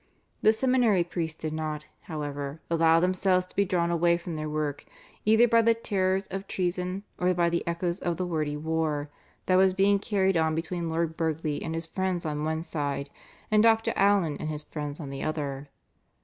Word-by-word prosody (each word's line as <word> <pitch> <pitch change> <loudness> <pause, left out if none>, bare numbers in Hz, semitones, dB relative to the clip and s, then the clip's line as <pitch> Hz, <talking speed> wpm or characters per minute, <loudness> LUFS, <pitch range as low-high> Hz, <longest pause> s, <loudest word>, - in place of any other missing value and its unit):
The 215 - +6
seminary 235 -5 +3
priests 165 -2 -4
did 155 -1 -3
not, 155 -1 -3 0.2
however, 145 -1 -4
allow 165 0 +5
themselves 185 +1 +2
to - - -19
be 200 - +3
drawn 170 -2 +1
away 170 0 +3
from 170 -1 -6
their 155 0 -3
work 150 -2 -2 0.4
either 220 +3 +6
by 230 0 +5
the 230 0 +4
terrors 195 -4 0
of 195 +1 -5
treason 180 +1 -2 0.2
or 180 +1 +3
by 170 -1 +2
the 170 - 0
echoes 170 +2 -1
of 170 -2 -2
the 185 - -1
wordy 155 -4 -2
war, 155 -2 -1 0.3
that 185 - +3
was 190 0 +4
being 200 +1 +4
carried 195 -3 +1
on 160 -1 +2
between 170 +1 -3
Lord 160 0 -1
Burghley 160 -2 -1
and 160 0 -3
his 165 0 -3
friends 185 0 -2
on 150 -1 -2
one 160 +1 -1
side, 145 -3 -3 0.4
and 215 0 +5
Dr. 225 0 +4
Allen 195 -6 +3
and 155 - -3
his 150 -1 -4
friends 150 -2 -6
on 140 -4 -6
the 135 0 -6
other. 145 -2 -3
170 Hz, 190 wpm, -27 LUFS, 155-190 Hz, 0.4 s, The